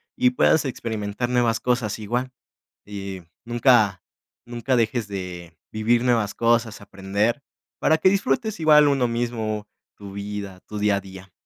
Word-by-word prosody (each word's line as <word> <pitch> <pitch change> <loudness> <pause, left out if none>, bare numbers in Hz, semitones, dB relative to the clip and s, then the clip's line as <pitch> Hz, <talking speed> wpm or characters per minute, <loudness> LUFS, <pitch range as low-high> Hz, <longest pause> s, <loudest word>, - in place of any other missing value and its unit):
y 255 0 +4
puedas 160 -10 +3
experimentar 110 -3 -3
nuevas 120 -2 +2
cosas 120 -4 -1
igual. 120 +5 -2 0.5
Y 100 -2 -7 0.2
nunca 120 -6 +3 0.4
nunca 120 +2 -1
dejes 115 -1 0
de 90 -4 -7 0.2
vivir 115 +2 +1
nuevas 115 -5 +1
cosas, 115 -2 +1
aprender 100 +7 -2 0.4
para 160 - +3
que 185 - +5
disfrutes 220 +1 0
igual 150 -2 +6
uno 135 -3 +2
mismo 115 -3 -3 0.3
tu 100 -1 -10
vida, 100 -2 -6
tu 105 - -6
día 105 -1 +2
a - - -4
día, 95 -1 -12
115 Hz, 140 wpm, -23 LUFS, 100-125 Hz, 0.5 s, igual